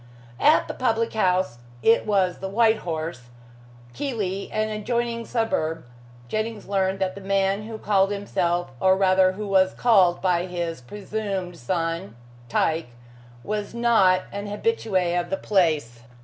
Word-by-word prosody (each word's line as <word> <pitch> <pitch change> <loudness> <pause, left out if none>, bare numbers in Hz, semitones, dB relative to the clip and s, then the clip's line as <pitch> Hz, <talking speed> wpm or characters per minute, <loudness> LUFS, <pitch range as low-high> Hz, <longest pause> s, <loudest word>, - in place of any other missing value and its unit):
At 305 +2 +4
the - - -4
public 230 -2 0
house 185 - +1 0.2
it 225 0 +4
was 190 -4 +1
the 190 - -4
"White 220 +2 +3
Horse," 160 -7 -5 0.6
Keighley, 205 -9 -3
an 215 0 -1
adjoining 230 +2 -2
suburb 165 - -1 0.4
Jennings 215 - -3
learned 195 -1 0
that 190 -1 -1
the 200 - -10
man 195 +1 0
who 225 -1 -6
called 195 -2 +2
himself 175 -5 -1
or 190 +3 +4
rather 185 -1 +4
who 210 +2 -5
was 190 -1 +3
called 190 -8 +4
by 180 -1 +1
his 170 -5 -4
presumed 195 - -5
son 165 - -2 0.3
Tyke, 160 0 0 0.5
was 210 +1 -4
not 220 -6 +4
an 200 +1 -5
habitue 220 - -2 0.2
of 175 0 -4
the 195 - -1
place. 155 - +1
195 Hz, 140 wpm, -24 LUFS, 175-215 Hz, 0.6 s, At